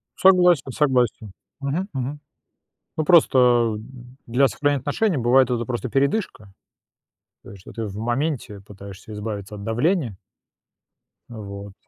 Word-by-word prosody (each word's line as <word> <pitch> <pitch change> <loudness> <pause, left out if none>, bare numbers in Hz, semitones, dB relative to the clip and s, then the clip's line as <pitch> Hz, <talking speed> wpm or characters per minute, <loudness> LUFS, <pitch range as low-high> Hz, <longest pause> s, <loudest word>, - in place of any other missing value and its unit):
Согласен 180 -7 +4
согласен. 125 -7 0 0.3
Мгм 155 +9 -3
мгм. 135 +3 -4 0.8
Ну, 155 - 0
просто 125 -9 +4 0.5
для 125 +4 +3
сохранения 145 0 0
отношений 170 - 0
бывает 125 +1 +3
это 120 -1 -1
просто 125 +1 -4
передышка. 135 - -1 0.9
То - - -13
есть, 100 -2 -12
что - - -13
ты 115 -1 -5
в 100 -1 -7
моменте 120 -2 -2
пытаешься 100 +1 -12
избавиться 105 -1 -6
от 100 - -9
давления. 120 - 0 1.1
Вот. 100 -3 -9
125 Hz, 120 wpm, -22 LUFS, 105-145 Hz, 1.1 s, Согласен